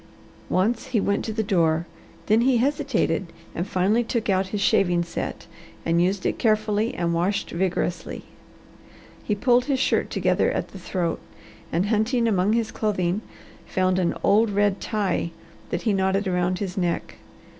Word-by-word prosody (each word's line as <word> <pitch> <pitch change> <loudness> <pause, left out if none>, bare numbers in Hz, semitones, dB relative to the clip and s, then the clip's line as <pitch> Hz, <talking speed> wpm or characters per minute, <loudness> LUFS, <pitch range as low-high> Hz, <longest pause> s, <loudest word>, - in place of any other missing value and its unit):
Once 220 +6 +1
he 230 - +1
went 200 0 0
to 220 - -3
the 220 0 -1
door, 170 -5 +2 0.4
then 215 +2 +4
he 255 0 +3
hesitated, 275 - 0 0.3
and 175 +3 -3
finally 200 +5 +2
took 230 -3 -1
out 190 0 +1
his 205 +2 -3
shaving 175 -3 +3
set 170 - -5 0.4
and 165 +1 +2
used 185 +2 0
it - - -1
carefully 215 +1 +1
and 170 -1 0
washed 180 +4 0
vigorously. 175 -1 -2 1.0
He 210 - 0
pulled 245 +3 +3
his 275 -2 +1
shirt - - +1
together - - +1
at - - -2
the - - -10
throat, 170 -4 -2 0.5
and 170 +4 +1
hunting 230 +3 +1
among 200 -1 +2
his 230 -1 0
clothing, 195 -2 -1 0.5
found 185 0 +1
an 175 -2 +1
old 220 +2 +4
red 205 -1 +1
tie 200 -6 -1 0.4
that - - -3
he 220 - +2
knotted 190 +1 +1
around 180 0 0
his 190 -1 -4
neck. 175 -2 -2
200 Hz, 160 wpm, -24 LUFS, 180-220 Hz, 1.0 s, then